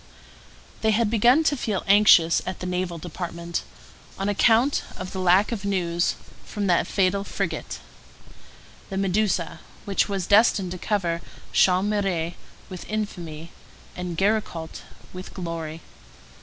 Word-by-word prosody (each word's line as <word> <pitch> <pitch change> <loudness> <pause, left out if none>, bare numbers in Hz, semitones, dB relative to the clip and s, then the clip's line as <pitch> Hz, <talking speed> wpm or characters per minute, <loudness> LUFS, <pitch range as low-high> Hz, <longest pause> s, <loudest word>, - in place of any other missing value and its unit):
They 220 - +2
had 220 0 +2
begun 240 +7 +4
to 300 - +2
feel 215 -7 -2
anxious 195 -5 +6
at 185 - -4
the - - -5
Naval 180 -1 -2
Department, 170 0 -5 0.6
on 195 +1 -1
account 230 +6 +3 0.2
of 185 0 -6
the 190 - -5
lack 185 +4 +4
of 215 -4 -4
news 175 -3 0 0.3
from 205 -1 -4
that 175 -3 +2
fatal 195 0 +1
frigate, - - -4 1.1
The 195 - -4
Medusa, 195 -2 0 0.3
which 200 +1 +1
was 195 -3 -2
destined 200 -3 +4
to 180 - -6
cover 170 -4 -1 0.3
Chaumareix 185 -3 +2 0.3
with 185 -2 -9
infamy 170 -7 -5 0.4
and 180 -2 -5
Géricault 195 -5 -1 0.3
with 185 +1 -9
glory. 165 -3 -5
185 Hz, 130 wpm, -24 LUFS, 175-205 Hz, 1.1 s, anxious